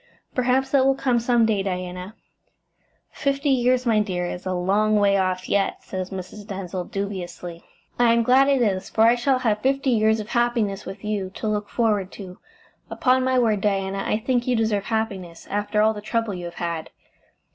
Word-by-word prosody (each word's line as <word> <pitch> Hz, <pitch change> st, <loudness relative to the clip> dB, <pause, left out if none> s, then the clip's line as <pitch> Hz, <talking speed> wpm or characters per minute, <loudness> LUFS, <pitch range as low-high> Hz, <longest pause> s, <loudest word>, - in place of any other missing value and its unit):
"Perhaps 260 Hz, +1 st, +1 dB
that 275 Hz, -2 st, +4 dB
will 270 Hz, 0 st, +3 dB
come 250 Hz, -3 st, +1 dB
some 235 Hz, 0 st, +3 dB
day, 215 Hz, -3 st, +1 dB
Diana." 180 Hz, +1 st, -5 dB, 1.0 s
"Fifty 280 Hz, 0 st, 0 dB
years, 255 Hz, 0 st, +2 dB
my 225 Hz, -3 st, +3 dB
dear; 185 Hz, -4 st, -1 dB
it's 180 Hz, +1 st, -5 dB
a -, -, -1 dB
long 205 Hz, +4 st, +2 dB
way 200 Hz, -1 st, +4 dB
off 185 Hz, -1 st, 0 dB
yet," 200 Hz, -1 st, 0 dB
said 185 Hz, -1 st, -4 dB
Mrs. 190 Hz, +2 st, -8 dB
Denzil 185 Hz, -3 st, -5 dB
dubiously. 180 Hz, -4 st, -6 dB, 0.4 s
"I 240 Hz, -1 st, +5 dB
am 235 Hz, 0 st, +3 dB
glad 260 Hz, +3 st, +5 dB
it 270 Hz, -3 st, +3 dB
is, 190 Hz, -4 st, -1 dB
for 220 Hz, -, -1 dB
I 230 Hz, +1 st, +6 dB
shall 255 Hz, +2 st, +1 dB
have 220 Hz, -4 st, 0 dB
(D.V.,) 270 Hz, +3 st, +3 dB
fifty 275 Hz, 0 st, -2 dB
years 220 Hz, -1 st, +3 dB
of 215 Hz, +1 st, -6 dB
happiness 235 Hz, -5 st, 0 dB
with 195 Hz, +2 st, -8 dB
you 210 Hz, -3 st, -2 dB
to 220 Hz, -, -4 dB
look 210 Hz, -1 st, -2 dB
forward 210 Hz, -5 st, 0 dB
to. 185 Hz, -3 st, -10 dB, 0.5 s
Upon 255 Hz, 0 st, +2 dB
my 260 Hz, 0 st, +2 dB
word, 220 Hz, -5 st, +2 dB
Diana, 195 Hz, -1 st, -1 dB
I -, -, 0 dB
think 245 Hz, +2 st, -1 dB
you 250 Hz, -, +2 dB
deserve 220 Hz, -3 st, 0 dB
happiness, 195 Hz, -7 st, -3 dB
after 210 Hz, +1 st, +1 dB
all 220 Hz, 0 st, +3 dB
the 210 Hz, -, -7 dB
trouble 225 Hz, 0 st, -1 dB
you 175 Hz, -1 st, -6 dB
have 170 Hz, -, -8 dB
had." 170 Hz, -2 st, -4 dB
210 Hz, 195 wpm, -23 LUFS, 190-240 Hz, 1.0 s, I